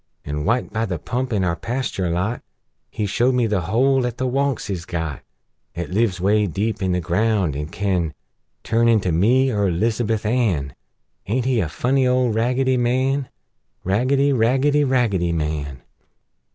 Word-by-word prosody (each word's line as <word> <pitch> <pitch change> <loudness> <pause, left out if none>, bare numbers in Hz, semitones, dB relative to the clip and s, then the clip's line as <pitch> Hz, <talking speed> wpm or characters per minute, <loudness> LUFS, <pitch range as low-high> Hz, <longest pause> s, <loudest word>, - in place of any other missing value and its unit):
An', 75 +1 -3
wite 115 +4 0
by 110 +1 -1
the 90 -3 -2
pump 125 +9 -3
in 105 -4 +1
our 85 -2 0
pasture 115 -7 -3
lot, 90 +8 -1 0.5
He 110 - -3
showed 120 +6 +1
me 125 -2 +2
the 105 -4 0
hole 125 +8 +2
'at 120 - -6
the 130 - -1
Wunks 135 0 -1
is 95 -5 -4
got, 80 -5 -4 0.5
'At 85 -2 -5
lives 100 -4 +1
'way 105 +3 +2
deep 105 +5 -2
in 95 -1 0
the 90 - +1
ground, 95 -2 0
an' 75 +1 -4
can 90 -4 -1 0.5
Turn 115 +1 +2
into 110 -6 +3
me, 125 +11 +3
er 100 -3 +1
'Lizabuth 110 +4 0
Ann! 100 - 0 0.5
Aint 120 +4 0
he 130 -3 +2
a 85 - -1
funny 130 - +1
old 125 -2 +2
Raggedy 125 +3 +1
Man? 130 +2 0 0.5
Raggedy! 135 +8 +2
Raggedy! 135 +5 +2
Raggedy 115 -10 +1
Man! 75 -4 -3
110 Hz, 165 wpm, -21 LUFS, 90-125 Hz, 0.5 s, into